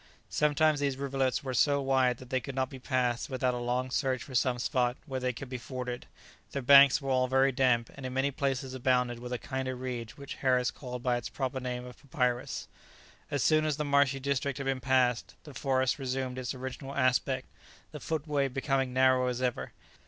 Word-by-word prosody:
Sometimes 150 0 +3
these 140 -2 0
rivulets 135 -1 -1
were 130 -1 -3
so 140 +3 +3
wide 130 -3 +2
that 130 +1 -13
they 130 - +2
could 135 0 -7
not 130 -1 -1
be 135 - -8
passed 125 -2 0
without 130 -1 0
a - - -3
long 125 +1 -1
search 130 -2 0
for 135 - -11
some 125 0 +2
spot 125 0 0
where 135 -3 -3
they 125 0 0
could 130 +3 -8
be 125 0 -5
forded; 125 -1 -5 0.5
their 140 - -3
banks 140 +1 +8
were 135 - -1
all 130 0 +3
very 135 +1 +3
damp, 125 -3 +2
and 135 - -11
in 130 - -4
many 135 +2 +1
places 135 -1 -2
abounded 125 -2 +1
with 125 +1 -7
a 125 - -1
kind 130 +1 -4
of 130 -1 -4
reed, 125 -3 -4
which 140 -1 -8
Harris 125 -2 +2
called 125 -2 -7
by 125 -1 +2
its 120 - -5
proper 130 -1 -3
name 125 -1 -4
of 125 -1 -11
papyrus. 125 -3 -1 0.6
As 145 -3 0
soon 155 -1 +4
as 155 -2 0
the 150 - -1
marshy 140 -1 +3
district 140 0 -1
had 140 - -4
been 135 -1 0
passed, 125 -2 +1
the 150 - -11
forest 130 0 0
resumed 130 -1 -3
its 130 +1 -4
original 130 +2 -6
aspect, 130 0 +1 0.5
the 150 - -7
footway 150 -2 -1
becoming 135 0 -1
narrow 130 0 +4
as 125 -1 -2
ever. 125 -2 -2
130 Hz, 210 wpm, -30 LUFS, 125-135 Hz, 0.6 s, banks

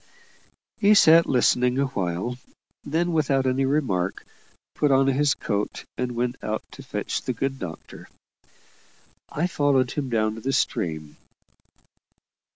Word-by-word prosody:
He 210 -1 +5
sat 165 -3 +6
listening 125 0 +2
awhile, 120 -3 -2 0.4
then, 170 +4 -1
without 140 -4 +1
any 130 +1 +1
remark, 100 -11 -1 0.5
put 150 - +1
on 135 0 +4
his 135 +1 +2
coat 105 -1 -3
and 125 -1 -3
went 120 +2 -3
out 110 0 -3
to - - -11
fetch - - -4
the 130 - -3
good 135 +3 -3
doctor. 85 -3 -9 1.2
I 155 - -1
followed 140 -7 +1
him 140 -3 -3
down 110 -2 +1
to 110 - -9
the 135 +4 -2
stream. 80 - -2
130 Hz, 130 wpm, -24 LUFS, 110-145 Hz, 1.2 s, sat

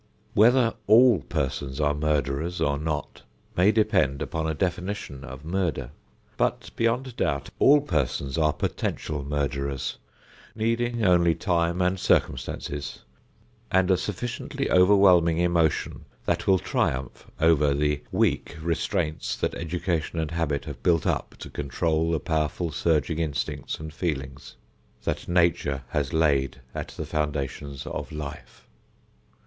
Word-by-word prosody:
Whether 120 +2 +5
all 115 -1 +7
persons 65 0 -3
are 75 -1 +2
murderers 75 +2 -1
or 70 0 +1
not 75 -1 -3 0.3
may 95 +4 +5
depend 100 - +2
upon 80 0 -2
a 80 - -1
definition 90 -5 -3
of 65 +2 -9
murder. 85 -7 -1 0.5
But, - - -1
beyond 115 +2 0
doubt, 70 -1 -1
all 145 +1 +6
persons 70 - -1
are 75 -2 +3
potential 75 0 -3
murderers, 70 -1 -2 0.6
needing 115 +1 0
only 85 -2 +4
time 85 -2 +1
and 90 +1 +1
circumstances, 70 0 -1 0.7
and 95 0 +3
a - - +6
sufficiently 120 - -3
overwhelming 90 -3 +5
emotion 85 -3 +1 0.2
that - - -1
will 95 - +6
triumph 65 -6 -2
over 75 -3 +4
the 75 0 0
weak - - 0
restraints 80 -1 -1
that - - -1
education 85 -1 -2
and 80 -2 -1
habit 80 -4 -1
have - - -8
built 85 -3 +2
up, - - -1
to - - -8
control 80 +3 0
the 80 -2 +1
powerful 80 +2 -1
surging 80 +1 +1
instincts 75 -4 -3
and 80 0 -7
feelings 70 -6 -4 0.5
that - - -3
Nature 85 -6 +1
has 70 0 -1
laid 70 -5 +1
at - - -4
the - - -6
foundation 70 -2 -3
of - - -5
life. 75 -2 -8
80 Hz, 130 wpm, -26 LUFS, 70-90 Hz, 0.7 s, all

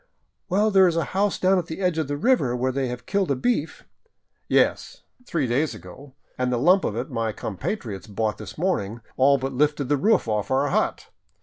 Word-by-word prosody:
" - - -51
Well, 210 +3 +2
there 190 -2 +6
is 170 - 0
a 165 - +2
house 200 +1 +1
down 185 0 +3
at 170 - -5
the 160 - -6
edge 180 -4 0
of 155 - -1
the 145 0 -3
river 150 - +2
where 130 +1 0
they 135 0 -1
have 125 0 -6
killed 195 -3 0
a 140 - +2
beef 160 - -1 0.2
— 465 - -42
" - - -53
" - - -47
Yes, - - -1 0.2
three 155 -5 0
days 135 +6 0
ago; 135 -1 -13 0.2
and 125 0 0
the 125 - +1
lump 180 +9 +4
of 105 - -2
it 125 +5 -4
my 115 -2 -1
compatriots 105 - -5
bought 105 0 -2
this - - -9
morning 120 - -1
all 140 +2 +4
but 135 0 -4
lifted 145 0 0
the 145 - +3
roof 210 - +2
off 105 -2 -1
our 135 +2 +1
hut. - - -1
140 Hz, 230 wpm, -24 LUFS, 125-180 Hz, 0.2 s, there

